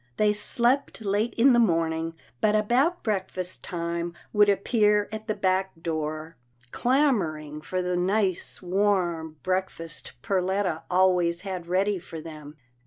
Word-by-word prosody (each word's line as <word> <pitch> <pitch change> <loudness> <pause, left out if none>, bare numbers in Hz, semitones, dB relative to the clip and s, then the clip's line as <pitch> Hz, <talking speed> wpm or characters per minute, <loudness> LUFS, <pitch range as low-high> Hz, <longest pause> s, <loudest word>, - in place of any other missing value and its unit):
They 210 -1 +3
slept 235 +3 0
late 210 +3 0
in 250 +3 +5
the 240 - +5
morning, 165 -5 +1 0.3
but 215 0 +3
about 255 +12 +2
breakfast 185 -3 -3
time 170 0 -3 0.2
would 210 -1 +5
appear 210 0 +3
at 220 0 -6
the 215 - 0
back 190 -2 0
door, 155 -1 -4 0.3
clamouring 185 - +1
for 185 +4 -2
the 180 0 -1
nice 185 +1 0
warm 175 -4 0
breakfast 185 -3 -3
Per 195 -2 +1
letta 185 -3 -1
always 180 -2 +3
had 185 -4 -5
ready 190 +2 +1
for 165 -2 -9
them. 155 -2 -10
185 Hz, 135 wpm, -26 LUFS, 170-210 Hz, 0.3 s, in